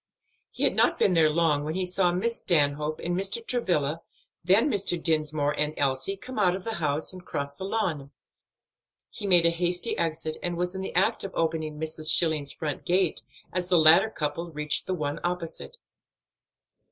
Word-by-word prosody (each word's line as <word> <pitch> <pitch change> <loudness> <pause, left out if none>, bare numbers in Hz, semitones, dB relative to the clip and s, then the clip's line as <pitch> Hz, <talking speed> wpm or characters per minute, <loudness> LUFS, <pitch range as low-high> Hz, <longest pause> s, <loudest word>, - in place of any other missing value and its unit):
He - - -5
had - - +2
not - - +3
been 190 - +3
there 160 -2 +4
long, 155 -2 +1
when 155 +2 -4
he 185 0 -1
saw 180 0 +1
Miss 230 +7 0
Stanhope 150 -2 +1
and 175 +1 -1
Mr. 195 +5 0
Travilla, 165 - 0 0.4
then 195 - +4
Mr. 200 - +2
Dinsmore 155 -3 +1
and 150 +1 -1
Elsie, 140 +8 -1
come 255 +3 -7
out 180 -3 +3
of 190 - -7
the 225 - -4
house 150 +3 -1
and 185 -1 -10
cross 140 -4 -4
the 190 - -6
lawn. 175 -10 -2 1.0
He 205 - -5
made 175 -3 +5
a 170 - +5
hasty 175 +5 -1
exit 160 -1 -2
and 175 -1 -3
was 180 +1 -2
in 190 - -5
the 190 - -5
act 185 - +2
of 195 - -7
opening 160 -2 -2
Mrs. 155 0 -3
Schilling's 155 -4 +3
front 150 -3 -4
gate 180 -1 +1 0.3
as 180 0 -2
the 180 -1 +3
latter 165 +7 +6
couple 165 -1 -4
reached 150 -1 -1
the 185 - -1
one 145 -3 -3
opposite. 180 - -4
170 Hz, 185 wpm, -26 LUFS, 155-185 Hz, 1.0 s, latter